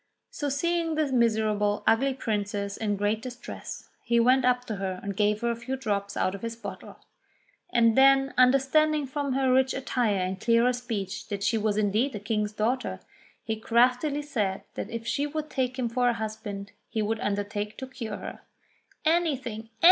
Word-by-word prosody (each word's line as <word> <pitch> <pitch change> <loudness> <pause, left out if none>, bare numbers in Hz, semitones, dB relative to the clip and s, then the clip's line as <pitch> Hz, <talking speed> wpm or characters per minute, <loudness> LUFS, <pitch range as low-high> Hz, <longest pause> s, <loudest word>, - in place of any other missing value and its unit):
So, 290 - -2
seeing 330 +3 0
the 305 -3 0
miserable, 215 -3 +2
ugly 265 +4 +3
princess 205 -4 -2
in 210 -2 -1
great 205 +2 0
distress, 245 0 -8 0.2
he 235 0 +2
went 255 +2 +4
up 250 0 +2
to 215 -4 -4
her 190 -1 -3
and 200 -1 -4
gave 210 +1 +2
her 235 0 +1
a - - -2
few 240 +3 -4
drops 200 -6 -2
out 185 - +1
of 200 - -7
his 230 0 -4
bottle; 230 - -8 0.7
and 230 -2 +4
then 270 0 +5
understanding 275 +4 +4
from 280 0 -2
her 265 -1 +2
rich 260 0 +3
attire 245 -5 0
and 185 +1 -3
clearer 235 +2 +4
speech 205 -6 -4
that 200 -1 -4
she 225 - +2
was 210 -1 0
indeed 215 +6 +1
a - - -3
King's 210 0 -1
daughter, 240 +5 -1 0.4
he 220 -1 -2
craftily 250 +6 +2
said 210 -9 -2
that - - -5
if 230 -1 -5
she 285 +5 0
would 305 +1 -4
take 260 -1 -1
him 250 -2 0
for 245 +1 +2
a - - +2
husband, 210 -2 -5 0.2
he 220 - -1
would 220 +1 -1
undertake 205 +1 -2
to 265 - -5
cure 230 -5 -6
her. - - -7 0.7
"Anything! 265 -10 0
230 Hz, 180 wpm, -27 LUFS, 210-265 Hz, 0.7 s, then